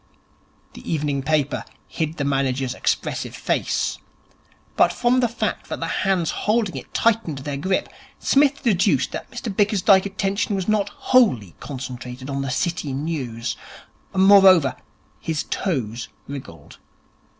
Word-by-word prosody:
The - - -8
evening 145 -3 0
paper 145 0 0 0.2
hid 160 +1 -3
the 145 - -1
manager's 135 -2 0
expressive - - -2
face, - - -1 0.8
but - - +4
from 245 +1 +2
the 245 - +3
fact 230 - -3
that - - -4
the - - -2 0.2
hands 190 -5 +1
holding 215 -2 0
it - - -8
tightened 225 -10 +1
their 140 +1 -4
grip 185 +7 0 0.3
Psmith 285 0 +2
deduced 200 -5 +2
that - - -6
Mr 215 -5 -5
Bickersdyke's 200 -1 +4
attention 200 +1 -1
was 190 -2 -3
not 210 -2 +1
wholly 200 - +2
concentrated 130 -1 -7
on 140 0 -2
the 135 - -3
City 155 0 -1
news. 130 -6 -3 0.6
Moreover, 190 -6 +6 0.4
his 160 -2 -2
toes 120 - -2 0.2
wriggled. 130 - -9
160 Hz, 130 wpm, -22 LUFS, 135-200 Hz, 0.8 s, Moreover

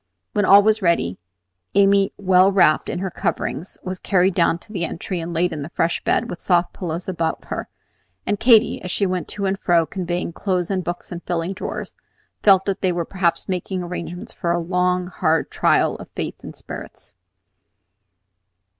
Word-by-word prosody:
When 205 -3 +2
all 200 +1 +8
was 215 +1 +3
ready, 170 - +1 0.6
Amy, 195 0 +4
well 190 0 +4
wrapped 175 -6 +3
in - - -2
her 190 0 -3
coverings, 170 +2 -3
was 185 0 -5
carried 190 -1 +2
down 170 -1 +2
the 195 -5 -4
entry 170 +2 -4
and 165 +1 -5
laid 170 +2 0
in 150 - -5
the 140 - -6
fresh 165 0 -1
bed - - +1
with 170 - -6
the - - -13
soft 175 -1 +2
pillows 170 -1 -4
about 165 -3 -2
her; - - -5 0.6
and 205 - -1
Katy, 230 -2 +5
as 180 - -6
she 200 - 0
went 185 -2 -2
to 200 - -4
and 195 +1 -1
fro, 170 -2 +3
conveying 175 -1 -3
clothes 185 -1 -1
and 185 -2 -1
books 175 0 -5
and 175 -1 -5
filling 175 +1 -2
drawers, 195 - -6 0.5
felt 195 -2 +5
that 195 -1 -2
they 185 - +2
were 170 -1 -2
perhaps 175 -2 -1
making 185 0 -3
arrangements 175 +3 -6
for 170 -3 -2
a 170 - +2
long, 180 +1 0
hard 165 -3 0
trial - - +2
of - - -11
faith - - -5
and - - -9
spirits. - - -9
180 Hz, 185 wpm, -21 LUFS, 170-195 Hz, 0.6 s, all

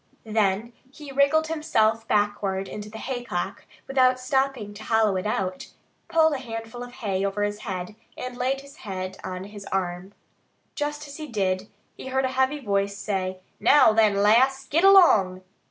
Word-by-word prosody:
Then 215 +1 0 0.2
he 290 0 -10
wriggled 280 +3 +3
himself 225 -9 +1
backward 205 -2 0
into 210 0 -7
the 220 - -9
haycock 240 -8 -4 0.2
without 255 -1 +3
stopping 255 -4 -1
to 210 +1 -10
hollow 220 -3 +2
it 185 +2 -2
out, 185 -3 -3 0.4
pulled 320 -2 +3
a 275 - -2
handful 225 -1 -7
of 245 0 -7
hay 200 -6 -2
over 200 +1 -1
his 205 0 -2
head, 190 -2 -5 0.2
and 250 0 -6
laid 260 +2 -1
his 280 0 -15
head 190 -2 -6
on 185 0 -5
his 205 0 -10
arm. 185 +1 -3 0.6
Just 295 0 -4
as 285 - -9
he 310 -1 -6
did 190 -6 0
so 200 - -17 0.3
he - - -8
heard 265 0 0
a - - 0
heavy 265 +3 +1
voice 200 -4 -1
say, 190 -2 -3 0.2
"Now, 225 0 +6
then, 215 -2 +4
lass, 250 +7 +4
git 325 +6 +1
along!" 215 - +6
220 Hz, 170 wpm, -25 LUFS, 200-265 Hz, 0.6 s, Now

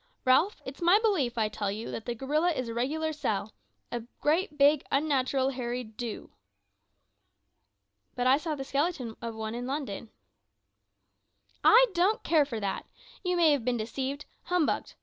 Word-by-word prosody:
Ralph, 290 +11 +3
it's 265 +4 -8
my 350 +4 +6
belief, 355 - +1
I 220 -1 +2
tell 205 -1 -3
you, 215 +3 -5
that 220 - -6
the 240 - -2
gorilla 300 +8 +1
is 255 -5 -3
a - - -4
regular 310 +7 -1
sell 215 -8 -2 0.4
a 240 - -2 0.2
great, 305 0 +1
big, 285 0 +5
unnatural 270 -2 +1
hairy 250 -1 -3
do!" 225 0 -7 1.8
"But 245 - -1
I 260 +2 +6
saw 310 0 -3
the 270 - -5
skeleton 275 -4 -1
of 230 -1 -5
one 220 0 -4
in 245 +1 -4
London." 265 -6 -4 1.5
"I - - +8
don't 370 +5 +2
care 310 -3 +4
for 235 -6 -4
that. 200 -2 -3 0.4
You 360 -1 0
may 330 -3 +5
have 285 -5 +1
been 245 0 0
deceived, 265 +6 -4 0.2
humbugged. 355 -4 0
270 Hz, 160 wpm, -29 LUFS, 235-310 Hz, 1.8 s, I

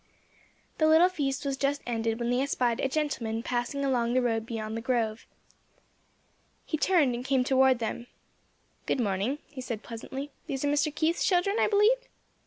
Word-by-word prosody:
The 310 - +4
little 320 +3 +6
feast 285 -5 -2
was 275 -1 -1
just 280 +1 -1
ended 225 -1 -1
when 235 0 -1
they 250 +1 +2
espied 250 -3 0
a 270 - 0
gentleman 245 -6 -2
passing 250 +4 -2
along 240 -3 +1
the 255 - +3
road 225 -2 0
beyond 220 -1 -4
the 225 - -3
grove. 230 -2 -1 1.4
He - - -2
turned 310 -5 +3
and 240 +1 -4
came 265 -1 +2
toward 265 0 +4
them. 235 +1 -4 0.8
"Good - - 0
morning," 205 +5 0
he 270 -3 -9
said, 230 -4 -5
pleasantly. 265 +5 -7 0.2
"These 270 0 -2
are - - +2
Mr. 295 +1 +1
Keith's 325 +2 +1
children, 390 +3 +2
I - - +4
believe?" 425 +4 +4
260 Hz, 175 wpm, -28 LUFS, 235-290 Hz, 1.4 s, little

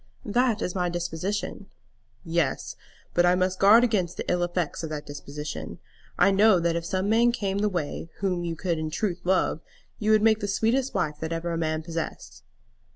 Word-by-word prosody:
"That 230 0 +1
is 180 - -2
my 180 -2 0
disposition." 175 +3 -3 0.6
"Yes; 165 -3 -1 0.4
but 175 - +4
I 175 0 +4
must 185 0 0
guard 215 +5 +7
against 195 -8 0
the - - -4
ill 180 0 +1
effects 175 -2 -1
of 160 - -4
that 150 -1 -5
disposition. 145 +1 -7 0.4
I 200 - +5
know 200 -1 +5
that 170 0 0
if 170 - -2
some 185 +3 -1
man 230 +3 +4
came 200 -5 -2
the 210 0 +2
way, 170 -2 -4
whom 185 -3 -1
you 170 -1 -3
could 170 0 -2
in 155 0 -2
truth 175 +3 -2
love, 185 -3 +1 0.4
you 215 - -1
would 215 -1 +5
make 220 -1 +4
the 205 - -3
sweetest 230 +6 0
wife 155 -6 -1
that 160 0 -4
ever 165 +1 -2
a - - -1
man 155 -1 -1
possessed." 165 -1 -6
180 Hz, 195 wpm, -26 LUFS, 165-205 Hz, 0.6 s, guard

